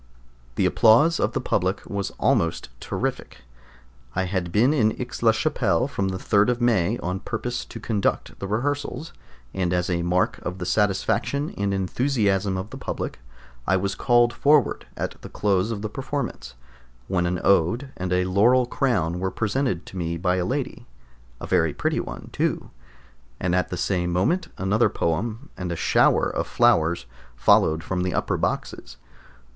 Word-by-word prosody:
The 95 - +1
applause 110 - +5
of - - 0
the - - 0
public 95 +3 -1
was 100 -3 -3
almost 85 0 +1
terrific. - - -4 0.7
I 95 - +1
had 90 -2 -2
been 120 - +4
in 110 -7 +1
Aix - - -5
la - - +6
Chapelle - - +1
from 100 - -2
the 95 -1 -2
3d 100 +3 +2
of 120 -1 0
May 115 -3 +2
on 90 +2 -2
purpose 120 +3 -4
to 115 - -9
conduct 105 -2 -1
the 100 - -4
rehearsals, 145 - -2 0.4
and 90 -2 -1
as 90 0 0
a 85 -1 0
mark 90 +1 +1
of 90 +1 -5
the 90 - -5
satisfaction 110 - 0
and 100 0 -1
enthusiasm 100 -1 0
of 95 +3 -6
the - - -8
public, - - -4 0.5
I 95 - +3
was 100 +1 -1
called 120 -1 +3
forward 145 0 +2
at - - -4
the - - -9
close 100 0 +1
of 110 -3 -4
the - - -1
performance, 135 - -5 0.5
when 90 -2 0
an 90 0 -1
ode 100 - +2
and 90 0 -4
a 90 0 +2
laurel 115 +7 +4
crown 100 -10 0
were 95 +1 -1
presented 110 -3 -1
to 95 - -9
me 85 -1 -2
by 90 +2 +1
a 90 - 0
lady 135 +4 -3 0.5
(a - - -6
very 80 -2 +1
pretty - - 0
one - - -7
too), - - -1 0.7
and 90 -1 0
at 90 0 +1
the 90 - -4
same 90 -1 0
moment 170 - +1
another 100 +5 +2
poem 110 - -2
and 90 -1 -4
a - - -2
shower - - +3
of - - -3
flowers 85 0 +2 0.3
followed 80 +6 +3
from 90 0 -2
the 90 0 -1
upper - - 0
boxes. - - -3
95 Hz, 170 wpm, -24 LUFS, 90-120 Hz, 0.7 s, la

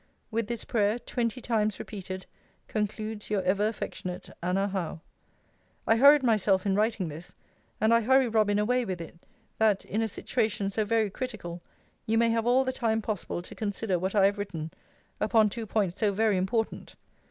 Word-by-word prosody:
With 225 -1 -1
this 235 -1 -3
prayer, 210 0 +1
twenty 240 0 -3
times 215 -4 0
repeated, 190 -2 -7 0.4
concludes 215 0 -3
Your 205 -3 0
ever 200 +3 +2
affectionate, 185 -4 -5
ANNA 190 +3 0
HOWE. 180 -5 -3 0.9
I 225 - +4
hurried 280 +3 +7
myself 210 -5 +2
in 195 - +2
writing 210 -2 +1
this; 160 +3 -9 0.4
and 220 +2 +4
I 230 - +5
hurry 260 +3 +4
Robin 215 -2 +2
away 250 +4 +2
with 185 -5 -4
it, 170 0 -9 0.4
that, 215 -3 +3
in 215 - -1
a 225 - +1
situation 205 -1 -1
so 215 +2 0
very 220 -1 +1
critical, 195 -9 -5 0.5
you 225 +1 +2
may 230 0 +4
have 230 0 0
all 255 +2 +4
the 260 0 -2
time 225 -3 0
possible 200 -4 -3
to - - -10
consider 205 -3 -2
what 190 +3 -2
I 200 -2 +6
have 200 +1 +1
written, 165 -6 -4 0.5
upon 215 0 +4
two 225 +1 -5
points 200 -4 0
so 210 -3 +2
very 215 +1 +2
important. 220 +5 -2
210 Hz, 175 wpm, -28 LUFS, 195-225 Hz, 0.9 s, hurried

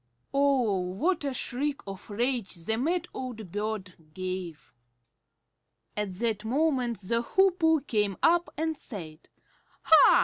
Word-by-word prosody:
Oh, 270 -8 +3
what 195 - 0
a 280 - -1
shriek 275 +3 -2
of 195 +1 -8
rage 235 -2 -1
the 180 +6 -1
mad 335 +8 0
old 225 -8 -6
bird 205 -2 -3 0.2
gave! 185 -8 -5 1.2
At 210 -2 -2
that 220 0 -1
moment 250 -3 +1
the 230 +5 0
Hoopoe 330 +1 +3
came 210 -7 0
up 345 +1 +4
and 320 +1 0
said, 165 - -9 0.5
"Ha! 320 - +8
230 Hz, 125 wpm, -28 LUFS, 195-285 Hz, 1.2 s, Ha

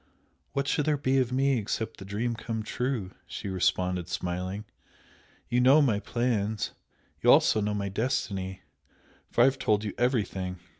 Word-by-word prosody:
"What 140 0 -1
should 145 +1 +1
there 150 -1 +3
be 135 -1 +2
of 125 -1 0
me 135 0 +2
except 110 +1 -3
the 95 - -9
dream 110 +5 -1
come 115 -1 -4
true?" 120 -4 -2 0.2
she 90 +4 -5
responded, 90 -1 0
smiling 90 +4 -3 0.8
"You 125 +1 +2
know 135 +4 +7
my 120 -9 +3
plans, 110 -2 -1 0.5
you - - +6
also 110 - +5
know 105 0 0
my 100 -1 -2
destiny, 95 -3 -2 0.7
for - - +2
I - - +8
have 135 0 +2
told 105 -1 +2
you 105 - -3
everything! 100 -7 0
110 Hz, 160 wpm, -28 LUFS, 95-125 Hz, 0.8 s, I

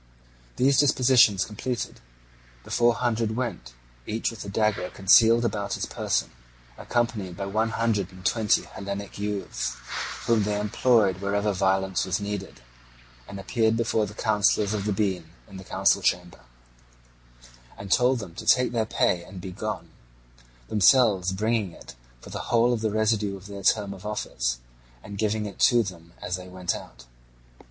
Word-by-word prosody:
These 135 +1 +3
dispositions 125 -7 +4
completed, 115 +3 -4 0.6
the - - -12
Four 120 0 +3
Hundred 115 -2 -1
went, 110 - -4 0.3
each 110 +2 -1
with 115 - -8
a 100 - -7
dagger 105 -2 0
concealed 115 +5 +5
about 105 -3 -2
his - - -3
person, - - -2 0.4
accompanied 110 -7 -2
by 100 - -3
one 110 +3 0
hundred 110 -4 -1
and 95 -1 -14
twenty 110 -3 +2
Hellenic 100 0 -7
youths, 100 -11 -3 0.5
whom 115 -2 +3
they 105 0 -1
employed 105 -2 +2
wherever 100 +1 0
violence 95 0 +1
was 95 +2 -1
needed, 100 -1 -5 0.7
and 100 - -8
appeared 110 +3 +1
before 110 -2 0
the 105 - -11
Councillors 105 -1 +2
of 100 -2 -2
the 105 - 0
Bean 95 -5 -1 0.2
in 100 -2 -11
the 95 - -9
council - - +2
chamber, 90 -1 -1 1.4
and 100 -1 -8
told 125 +3 +4
them 100 -7 -8
to - - -8
take 125 -1 +4
their 115 -2 0
pay 90 -4 +1
and 95 0 -10
be 90 +1 -7
gone; 110 +3 -5 0.8
themselves 105 -4 +4
bringing 105 -1 -1
it - - -12 0.3
for - - -12
the - - -6
whole 120 +1 +3
of 115 - -2
the 110 - 0
residue 105 -2 0
of 95 - -15
their 100 -1 -8
term 100 0 +2
of 95 0 -12
office, - - -2 0.5
and 100 0 -9
giving 110 0 0
it 100 - -8
to 120 -2 +5
them 85 -3 -9
as 90 0 -2
they 90 0 -10
went 90 -1 -2
out. - - -10
105 Hz, 160 wpm, -26 LUFS, 95-115 Hz, 1.4 s, concealed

